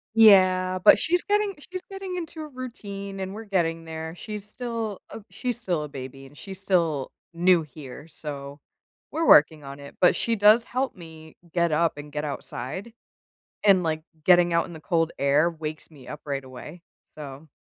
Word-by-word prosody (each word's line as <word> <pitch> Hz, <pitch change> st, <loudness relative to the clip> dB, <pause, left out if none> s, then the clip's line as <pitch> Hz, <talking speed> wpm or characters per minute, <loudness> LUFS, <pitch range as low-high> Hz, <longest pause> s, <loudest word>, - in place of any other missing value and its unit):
Yeah, 185 Hz, -4 st, +6 dB
but -, -, +8 dB
she's 355 Hz, +2 st, +2 dB
getting 415 Hz, -1 st, +1 dB, 0.2 s
she's 370 Hz, 0 st, -4 dB
getting 385 Hz, -2 st, -5 dB
into 325 Hz, -2 st, -6 dB
a 305 Hz, -, -6 dB
routine, 200 Hz, -7 st, -7 dB
and 190 Hz, 0 st, -4 dB
we're 220 Hz, +2 st, -8 dB
getting 165 Hz, -5 st, 0 dB
there, 160 Hz, 0 st, -6 dB
she's 210 Hz, +2 st, -7 dB
still 225 Hz, -2 st, -4 dB
a -, -, -8 dB
she's 245 Hz, -2 st, -3 dB
still 175 Hz, -9 st, -1 dB
a 150 Hz, -, -7 dB
baby, 135 Hz, 0 st, -8 dB
and 140 Hz, +2 st, -16 dB
she's 190 Hz, -1 st, -8 dB
still 165 Hz, -8 st, +1 dB, 0.2 s
new 175 Hz, 0 st, +4 dB
here, 145 Hz, -1 st, -10 dB
so 145 Hz, -2 st, -7 dB, 0.5 s
we're 325 Hz, +1 st, 0 dB
working 150 Hz, 0 st, +6 dB
on 140 Hz, 0 st, -9 dB
it, 140 Hz, 0 st, -11 dB
but 180 Hz, -, +6 dB
she 230 Hz, -, 0 dB
does 215 Hz, +3 st, +6 dB
help 260 Hz, +1 st, -2 dB
me 160 Hz, -2 st, -13 dB, 0.2 s
get 170 Hz, -2 st, +2 dB
up 160 Hz, 0 st, +1 dB
and 145 Hz, 0 st, -9 dB
get 150 Hz, 0 st, -3 dB
outside. 150 Hz, -, -5 dB, 0.7 s
And, 195 Hz, -3 st, +6 dB
like, 155 Hz, -1 st, -1 dB, 0.2 s
getting 175 Hz, -1 st, +5 dB
out 170 Hz, -, +3 dB
in -, -, -11 dB
the 160 Hz, -, -9 dB
cold 165 Hz, -1 st, +1 dB
air 145 Hz, +4 st, +3 dB
wakes 155 Hz, -1 st, -7 dB
me 135 Hz, -5 st, -15 dB
up 150 Hz, -, -8 dB
right 140 Hz, -2 st, -3 dB
away. 140 Hz, +6 st, -10 dB, 0.2 s
So 145 Hz, +1 st, -11 dB
170 Hz, 185 wpm, -25 LUFS, 150-210 Hz, 0.7 s, but